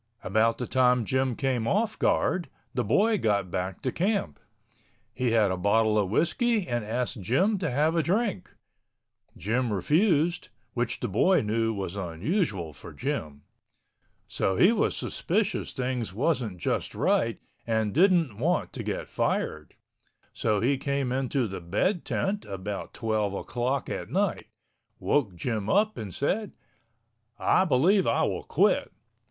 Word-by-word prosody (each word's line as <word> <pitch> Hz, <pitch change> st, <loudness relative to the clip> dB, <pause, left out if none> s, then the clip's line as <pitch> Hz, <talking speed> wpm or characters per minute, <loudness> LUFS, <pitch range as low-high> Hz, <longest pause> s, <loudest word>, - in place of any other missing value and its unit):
About 110 Hz, +3 st, +2 dB
the 125 Hz, -, -3 dB
time 125 Hz, -2 st, +3 dB
Jim 130 Hz, +1 st, 0 dB
came 125 Hz, -4 st, -1 dB
off 215 Hz, -, 0 dB
guard, 175 Hz, -6 st, +1 dB, 0.2 s
the 125 Hz, -, 0 dB
boy 205 Hz, -, +2 dB
got 100 Hz, -4 st, 0 dB
back 95 Hz, +2 st, -3 dB
to 130 Hz, -, 0 dB
camp. 180 Hz, -, -1 dB, 0.7 s
He 125 Hz, 0 st, 0 dB
had 110 Hz, -4 st, +3 dB
a 95 Hz, -, -1 dB
bottle 105 Hz, +3 st, +2 dB
of 100 Hz, -3 st, 0 dB
whiskey 210 Hz, -, +1 dB
and 120 Hz, -2 st, -1 dB
asked 120 Hz, +1 st, -2 dB
Jim 185 Hz, -, +1 dB
to 175 Hz, -4 st, -1 dB
have 150 Hz, +6 st, +1 dB
a 165 Hz, -, +3 dB
drink. 185 Hz, -, -1 dB, 0.9 s
Jim 115 Hz, +6 st, -1 dB
refused, 160 Hz, -, +2 dB, 0.2 s
which 120 Hz, -1 st, -2 dB
the 120 Hz, -, -1 dB
boy 120 Hz, -, +3 dB
knew 115 Hz, +1 st, 0 dB
was 100 Hz, -3 st, -4 dB
unusual 95 Hz, -, -2 dB
for -, -, -11 dB
Jim. 75 Hz, -2 st, -4 dB, 0.8 s
So 95 Hz, -, -1 dB
he 185 Hz, -, +6 dB
was 220 Hz, -3 st, 0 dB
suspicious 200 Hz, +3 st, -1 dB
things 125 Hz, -6 st, -3 dB
wasn't 120 Hz, -, 0 dB
just -, -, -2 dB
right -, -, +1 dB, 0.3 s
and 110 Hz, -2 st, 0 dB
didn't 165 Hz, -, +3 dB
want 170 Hz, +7 st, 0 dB
to -, -, -5 dB
get -, -, -4 dB
fired. 75 Hz, -1 st, -2 dB, 0.6 s
So 105 Hz, -2 st, 0 dB
he 130 Hz, +3 st, +1 dB
came 140 Hz, -2 st, -1 dB
into 130 Hz, 0 st, 0 dB
the 95 Hz, -2 st, -6 dB
bed 135 Hz, -, 0 dB
tent 200 Hz, +1 st, -1 dB
about 100 Hz, +1 st, -6 dB
twelve 110 Hz, -3 st, -1 dB
o'clock 125 Hz, +6 st, -2 dB
at -, -, -5 dB
night, -, -, -1 dB, 0.5 s
woke 115 Hz, -11 st, 0 dB
Jim 110 Hz, +1 st, -3 dB
up 215 Hz, +2 st, +3 dB
and 105 Hz, -4 st, -6 dB
said, 195 Hz, -, -1 dB, 0.8 s
"I 185 Hz, -, +3 dB
believe 180 Hz, +7 st, +3 dB
I -, -, +2 dB
will -, -, -1 dB
quit." -, -, +1 dB
125 Hz, 145 wpm, -27 LUFS, 105-165 Hz, 0.9 s, he